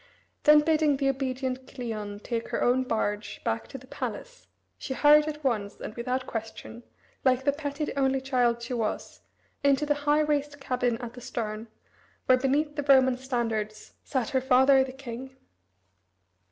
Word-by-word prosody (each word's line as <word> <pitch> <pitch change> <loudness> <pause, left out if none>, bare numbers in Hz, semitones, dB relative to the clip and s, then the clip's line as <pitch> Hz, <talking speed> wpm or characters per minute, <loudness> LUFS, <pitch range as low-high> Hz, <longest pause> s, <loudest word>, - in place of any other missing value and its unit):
Then 300 0 +8
bidding 305 -2 +2
the 275 0 +1
obedient 260 -1 -3
Cleon 215 -5 -6
take 230 0 -3
her - - -2
own 250 +1 +3
barge 210 -3 -2
back - - -2
to - - -8
the - - -14
palace, - - -7 0.3
she 265 - -4
hurried 300 +2 +6
at 300 0 -5
once, 210 -6 -1
and - - -6
without 250 +2 -2
question, 225 +1 -7 0.4
like 260 -1 +3
the 285 - +3
petted 290 +1 -4
only 270 -1 +2
child 245 -3 +1
she 245 - -4
was, 225 -3 -3 0.4
into 280 +1 +3
the 295 - +2 0.2
high 300 +1 +5
raised 290 -1 -1
cabin 250 -3 -1
at 235 0 -7
the 250 - -11
stern, 220 -1 -4 0.6
where 255 0 +5
beneath 290 +3 0
the 290 - -2
Roman 260 -2 +6
standards 230 -5 -3
sat 255 -5 -2
her 260 - +1
father 265 +1 +5
the 265 - -6
king. 260 0 -8
260 Hz, 165 wpm, -27 LUFS, 235-280 Hz, 0.6 s, Then